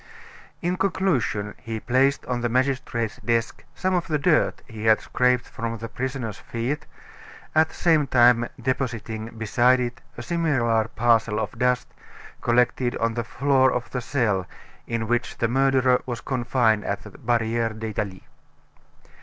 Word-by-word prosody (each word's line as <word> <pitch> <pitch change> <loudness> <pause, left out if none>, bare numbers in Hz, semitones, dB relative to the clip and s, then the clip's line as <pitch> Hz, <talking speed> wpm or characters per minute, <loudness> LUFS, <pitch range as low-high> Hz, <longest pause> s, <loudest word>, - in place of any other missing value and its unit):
In 180 +2 0
conclusion, 135 - 0
he 115 -2 -5
placed 130 +4 +2
on 125 -1 -2
the 120 - 0
magistrate's 125 -3 -1
desk 115 0 -1
some 185 0 0
of 175 -2 0
the 155 - +1
dirt 155 +2 +2
he 110 -1 -7
had 110 -1 +5
scraped 125 -1 +1
from 115 0 -4
the 115 +1 -6
prisoner's 125 -4 -4
feet; 120 +6 -4 0.7
at 160 0 +4
the - - -14
same 160 -4 +3
time 120 -1 +5
depositing 115 -3 -3
beside 120 +4 +3
it 120 -1 -3 0.2
a 120 - -6
similar 120 -9 +1
parcel 115 -2 +2
of 105 -2 -2
dust 125 0 +1 0.5
collected 125 +1 +2
on 115 0 0
the 120 0 -2
floor 130 +2 +2
of 125 -1 -3
the 125 - -2
cell 110 -8 0 0.4
in 115 -1 -2
which 120 +1 -1
the 115 - +1
murderer 130 0 +3
was 120 -2 -3
confined 120 -4 +1
at - - -3
the - - -11
Barriere 115 -1 0
d'Italie. 105 -3 -4
120 Hz, 150 wpm, -24 LUFS, 115-130 Hz, 0.7 s, had